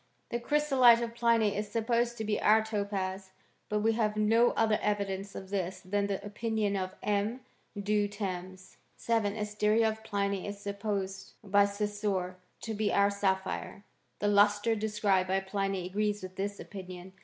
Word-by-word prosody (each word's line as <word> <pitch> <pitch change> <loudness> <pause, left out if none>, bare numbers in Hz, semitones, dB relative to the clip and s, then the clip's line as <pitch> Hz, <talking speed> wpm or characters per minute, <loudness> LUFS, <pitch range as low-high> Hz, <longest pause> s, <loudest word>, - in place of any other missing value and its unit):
The 235 - -1
chrysolite 260 -3 +5
of 230 0 -4
Pliny 230 -3 +2
is 210 0 -3
supposed 235 +1 0
to 220 - -3
be 210 -1 -1
our 215 +1 +5
topaz: 195 -3 -3 0.4
but 210 0 0
we 225 +1 +3
have 215 -2 0
no 225 +3 +4
other 220 -1 +2
evidence 200 -1 -2
of 190 0 -8
tliis 190 -1 -3
than 200 +2 0
the 200 0 -3
opinion 210 -1 -1
of 185 -1 -3
M. 210 +4 0 0.4
Du 205 0 +1
Terns. 185 -2 -6 0.2
7. 220 -3 0
Asteria 210 +1 +2
of 220 0 -6
Pliny 200 -2 -1
is 205 0 -5
supposed 200 -1 -4
by 200 0 +4
Saussure 200 -3 -2 0.2
to 225 - -4
be 210 -1 0
our 200 0 +3
sapphire. 195 0 -2 0.3
The 205 - -1
lustre 205 +2 +4
described 210 -3 +1
by 190 +1 +1
Pliny 195 -1 -2
agrees 205 +2 -1
with 185 0 -8
this 200 +1 -3
opinion. 185 -1 -9
205 Hz, 160 wpm, -30 LUFS, 195-220 Hz, 0.4 s, chrysolite